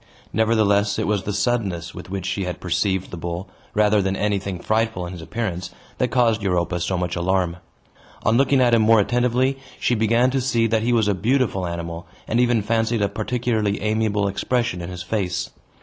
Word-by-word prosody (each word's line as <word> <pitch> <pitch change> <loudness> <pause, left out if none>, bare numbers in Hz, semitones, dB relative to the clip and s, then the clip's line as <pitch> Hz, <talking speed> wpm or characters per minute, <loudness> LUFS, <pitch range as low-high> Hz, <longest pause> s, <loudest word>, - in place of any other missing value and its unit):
Nevertheless, 105 -2 +2
it - - 0
was 100 -2 0
the 105 - -1
suddenness 100 -5 -1
with 90 - -9
which 95 -1 -4
she 95 +1 -1
had 90 -1 -4
perceived 95 +1 -1
the 90 - -6
bull, 85 +3 -4 0.3
rather 105 0 +4
than 95 0 -1
anything 100 -2 -1
frightful 110 -1 0
in 90 - -7
his 85 - -8
appearance, 95 -1 -4 0.3
that 125 - +2
caused 115 -3 +2
Europa 90 -2 0
so 90 +2 -1
much 90 -1 -2
alarm. 90 -1 0 0.7
On 115 - +3
looking 135 +1 +4
at 120 -1 +4
him 115 - +5
more 110 0 +5
attentively, 125 +4 +1 0.2
she - - +1
began 115 +3 +3
to 135 0 0
see 120 -3 +1
that 110 -1 +1
he 120 +2 +1
was 115 -3 +3
a 105 - +3
beautiful 110 -2 0
animal, 85 0 -5 0.2
and 115 - +1
even 120 -3 +3
fancied 115 0 +1
a - - +3
particularly 110 -2 -1
amiable 105 -1 0
expression 110 -1 -1
in 85 - -6
his 90 -1 -6
face. 95 -2 -2
105 Hz, 195 wpm, -22 LUFS, 90-115 Hz, 0.7 s, him